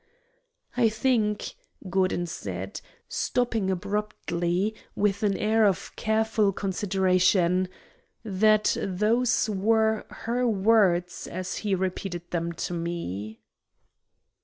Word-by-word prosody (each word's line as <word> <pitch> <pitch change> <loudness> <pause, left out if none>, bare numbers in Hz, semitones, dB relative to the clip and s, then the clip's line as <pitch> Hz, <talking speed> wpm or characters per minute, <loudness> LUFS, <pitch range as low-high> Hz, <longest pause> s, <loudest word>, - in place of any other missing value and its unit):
"I 240 -2 +4
think," 220 -2 0 0.3
Gordon 185 -1 +1
said, 95 - -6 0.3
stopping 230 -5 0
abruptly, 190 -1 -1 0.2
with 200 -1 +1
an 200 -2 +1
air 220 +1 +2
of 195 -4 +1
careful 220 -1 +1
consideration, 185 -2 +2 0.6
"that 215 +1 +3
those 220 +6 +1
were 220 +2 +1
her 245 +2 -1
words 195 -5 +2
as 185 +1 -4
he 205 -3 0
repeated 185 -1 -4
them 170 -1 -1
to - - -4
me." 110 - -4
195 Hz, 95 wpm, -26 LUFS, 180-220 Hz, 0.6 s, I